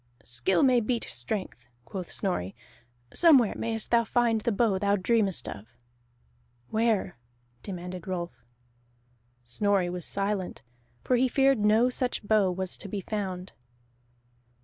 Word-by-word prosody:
"Skill 125 +9 +1
may 255 -3 +5
beat 235 +1 -1
strength," 185 - -4 0.3
quoth 180 +7 -6
Snorri. 120 - -2 0.6
"Somewhere 280 -11 +5
mayest 225 -1 -3
thou 235 -1 +5
find 230 0 +1
the 235 - 0
bow 205 -2 +2
thou 200 +1 +2
dreamest 205 -1 +1
of." 100 +2 -7 1.0
"Where?" 220 - 0 0.4
demanded 180 -1 -7
Rolf. 175 -2 -3 1.1
Snorri 185 - +1
was 180 -1 -5
silent, 195 -5 -2 0.4
for 250 - +2
he 260 +2 +3
feared 270 -1 +3
no 215 +4 +4
such 250 -2 -1
bow 210 -3 +4
was 185 0 -3
to 200 - -8
be 200 0 -3
found. 190 -3 -4
205 Hz, 125 wpm, -28 LUFS, 185-230 Hz, 1.1 s, may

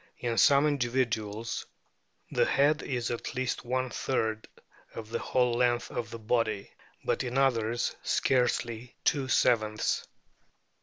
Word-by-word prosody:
In 120 -2 -2
some 140 +7 +6
individuals 115 -5 -1 0.6
the - - +3
head 145 +2 +3
is 120 -3 -2
at 120 +2 -4
least 130 -1 -2
one 130 +1 -1
third 110 -4 -1 0.5
of 110 -1 -7
the 115 - -1
whole 125 -2 +1
length 120 0 +1
of 115 - -4
the 115 - -7
body, 110 -2 -1 0.3
but - - 0
in 125 +1 -3
others 120 -4 +1
scarcely 125 -2 0
two 140 -3 +1
sevenths." 110 -4 +1
120 Hz, 125 wpm, -29 LUFS, 115-130 Hz, 0.6 s, some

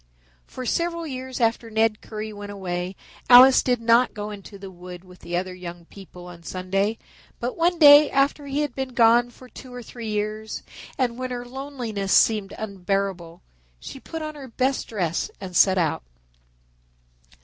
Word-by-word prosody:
For 255 - -7
several 335 +5 -1
years 260 -3 -6
after 230 0 0
Ned 220 -1 +1
Currie 215 0 -7
went 205 0 -8
away 185 -1 -4 0.3
Alice 255 +2 +9
did 245 -2 0
not 230 +2 +3
go 210 0 -5
into 200 0 -10
the 195 -1 -10
wood 180 0 -11
with 180 -1 -16
the 175 +1 -4
other 185 +1 -3
young 175 -1 -9
people 180 -1 -13
on 175 -1 -11
Sunday, 195 +5 -2 0.4
but 245 +2 -3
one 345 +1 +1
day 295 -1 +8
after 280 +1 +1
he 280 +2 -1
had 295 -4 -2
been 265 -1 -5
gone 235 +1 +5
for 255 +1 -15
two 255 0 -12
or 245 -1 -8
three 230 0 -8
years 215 +1 -3 0.3
and 245 -2 -1
when 255 0 -3
her 245 -1 -5
loneliness 245 -7 -4
seemed 210 -3 +3
unbearable, 195 -4 -3 0.4
she 270 - -9
put 325 +3 -7
on 310 0 -5
her 285 -3 -10
best 260 +2 -1
dress 175 -7 -2
and 185 -2 -8
set 190 +1 +5
out. 165 -4 0
220 Hz, 170 wpm, -24 LUFS, 190-255 Hz, 0.4 s, Alice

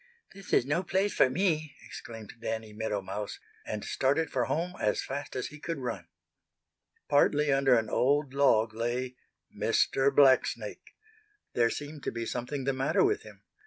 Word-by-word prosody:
"This 195 0 -11
is - - +4
no 145 +6 +1
place 190 +2 0
for 130 - +4
me!" 155 0 0
exclaimed 115 -4 -9
Danny 110 -1 -4
Meadow 105 -2 -2
Mouse, 100 +2 -5 0.3
and 105 -1 -4
started 145 +5 +1
for 125 -2 +1
home 175 +3 -1
as 105 - +1
fast 140 +1 -5
as 125 - -3
he 150 - -12
could 165 +1 -4
run. 110 -10 -5 1.0
Partly 145 0 +3
under 135 -2 +4
an 110 -1 0
old 140 +4 +1
log 115 -6 +3
lay 120 +3 -2 0.4
Mr. 135 +1 +2
Blacksnake. 135 -1 +2 0.6
There 120 -1 +3
seemed 145 +3 -6
to - - -1
be 115 0 -4
something 125 +4 -3
the 135 +1 0
matter 130 +2 +2
with 410 +1 +2
him. - - -14
135 Hz, 160 wpm, -29 LUFS, 115-145 Hz, 1.0 s, is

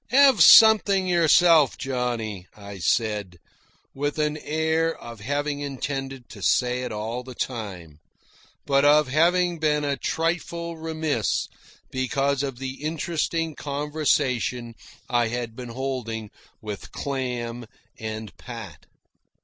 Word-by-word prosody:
"Have 270 +1 +6
something 210 -3 +7
yourself, 170 -3 +5
Johnny," 120 -7 -3
I 100 -1 -9
said, 105 -1 0 0.6
with 145 +2 -2
an 150 0 0
air 160 +2 0
of 115 -1 -10
having 145 +5 -2
intended 135 -2 -5
to - - -11
say 125 0 +2
it 125 - -4
all 110 +3 -4
the 125 0 -11
time, 95 - -5 0.7
but 140 0 +3
of 145 -1 +5
having 175 +4 +2
been 150 -1 +1
a 140 -1 0
trifle 170 +2 -2
remiss 160 -7 -1 0.4
because 135 +2 0
of 135 -3 -4
the 135 +2 -6
interesting 165 +1 -1
conversation 140 -5 -1 0.3
I 120 -1 +2
had 120 -1 -4
been 125 -1 -7
holding 115 -4 -4 0.3
with 105 -2 -7
Clam 125 -4 -4 0.3
and 110 -1 -6
Pat. 115 - -9
135 Hz, 115 wpm, -24 LUFS, 115-155 Hz, 0.7 s, something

